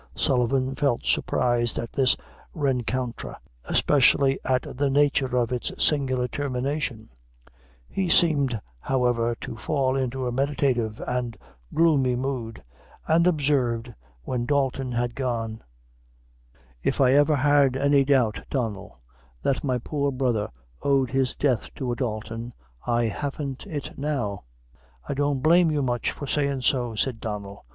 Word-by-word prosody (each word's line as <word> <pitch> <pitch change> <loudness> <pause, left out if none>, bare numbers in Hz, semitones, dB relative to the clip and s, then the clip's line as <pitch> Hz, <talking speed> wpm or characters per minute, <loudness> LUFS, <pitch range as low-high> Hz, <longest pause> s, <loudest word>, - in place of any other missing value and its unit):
Sullivan 130 - +1
felt 140 -3 0
surprised 120 -2 +1
at 115 - -4
this 130 -2 +3 0.4
rencontre, 130 -4 -2 0.3
especially 135 -1 +3
at 130 0 +1
the 140 +2 +1
nature 135 -2 +2
of 120 -1 +1
its 125 -1 -2
singular 130 -4 +1
termination; 135 -2 -3 0.8
he 190 -2 -2
seemed, 140 -9 +3 0.2
however, 120 - +1
to - - -6
fall 130 +2 0
into 130 -1 -1
a 125 - -1
meditative 130 -4 0
and 125 -2 -2 0.3
gloomy 145 -6 +3
mood, 125 -3 -4 0.4
and 165 +2 +4
observed 130 -7 +1 0.3
when 120 - -2
Dalton 135 -2 0
had 120 0 -1
gone 115 -4 -3 1.2
"If - - -1
I 130 -1 +5
ever 145 +2 +5
had 140 -1 +3
any 140 0 +4
doubt, 130 -6 +2
Donnel, 110 - -3 0.4
that 135 - 0
my 130 -3 +1
poor 140 +3 -1
brother 125 -5 0 0.3
owed 135 -3 +2
his 130 -1 0
death 130 -5 0
to 130 -2 -3
a - - -1
Dalton, 115 0 -4 0.3
I 120 0 +2
haven't 135 +3 -4
it 145 -4 -6
now." 120 - -2 0.6
"I - - -1
don't 145 -1 0
blame 170 +1 +5
you 150 -2 0
much 120 -2 0
for 145 - -6
sayin' 140 -2 -1
so," 125 -2 +1
replied 115 +1 -2
Donnel. 100 -2 -6
130 Hz, 135 wpm, -25 LUFS, 120-140 Hz, 1.2 s, I